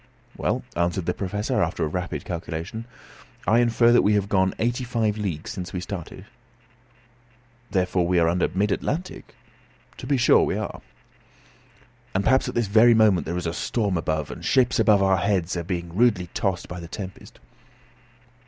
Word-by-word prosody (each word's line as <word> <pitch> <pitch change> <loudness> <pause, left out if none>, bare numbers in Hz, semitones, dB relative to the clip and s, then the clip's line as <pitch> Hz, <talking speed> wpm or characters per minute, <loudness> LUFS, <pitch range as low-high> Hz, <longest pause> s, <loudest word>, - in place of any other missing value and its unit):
"Well," - - -1
answered 85 +1 0
the 90 - 0
Professor, 105 +3 -2
after - - -1
a - - -1
rapid 90 +4 -4
calculation, 85 +5 -5 0.6
"I 115 +2 +4
infer 120 0 +4
that 120 - +6
we 105 +1 +3
have 100 -1 0
gone 95 -2 +2
eighty 120 +2 -1
five 115 -4 0
leagues 95 -8 -4
since 90 -2 -6
we 90 - -2
started." 90 -2 -7 1.4
"Therefore 90 -2 +1
we 90 0 +2
are 85 -1 +4
under 90 +2 +1
mid 100 +3 -1
Atlantic?" 175 +5 -4 0.6
"To - - -8
be 140 0 +2
sure 120 - +5
we - - 0
are." - - -5 1.3
"And 95 - +1
perhaps 130 +3 +3
at - - -7
this 120 - +1
very 110 +4 +5
moment 110 -5 +3
there 85 +2 -2
is 90 - -4
a 80 - -2
storm 100 0 -1
above, 80 -2 -2
and - - -9
ships 125 -2 +2
over 110 - +4
our 95 -2 +4
heads 90 -2 0
are 85 - -2
being 85 -1 -5
rudely 105 -6 +2
tossed 95 -3 -1
by 90 +1 -7
the 85 - -8
tempest." 95 +2 -9
95 Hz, 175 wpm, -24 LUFS, 90-110 Hz, 1.4 s, that